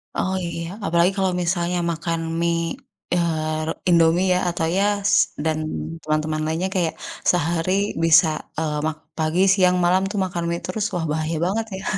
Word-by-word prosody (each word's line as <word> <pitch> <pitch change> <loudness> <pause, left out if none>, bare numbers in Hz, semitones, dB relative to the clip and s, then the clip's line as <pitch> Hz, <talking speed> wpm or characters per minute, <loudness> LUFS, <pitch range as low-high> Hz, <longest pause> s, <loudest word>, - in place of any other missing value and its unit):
Oh 190 +1 0
iya, 170 0 -4 0.2
apalagi 170 +2 +3
kalau 190 -1 +1
misalnya 175 0 0
makan 165 0 -2 0.2
mi, 170 - +1 0.7
eee, 155 -3 0
re - - 0 0.2
Indomie 170 +1 +4
ya, 180 - +2
atau 170 -1 -1
ya 200 0 +1 0.3
dan 160 -1 0 0.5
teman-teman 155 0 -1
lainnya 165 +4 -1
kayak, 170 -3 +1 0.4
sehari 170 0 0 0.3
bisa, 165 +1 +6 0.3
eee, 155 -2 -1
mak 155 0 -2 0.2
pagi, 160 +3 +1
siang, 180 -2 +3
malam 180 +2 +3
tuh 210 - -4
makan 175 -2 -4
mie 170 0 -1
terus, 205 +3 -2
wah 175 -2 -1
bahaya 155 +1 -1
banget 215 +5 -1
ya. - - -9
170 Hz, 160 wpm, -22 LUFS, 160-180 Hz, 0.7 s, bisa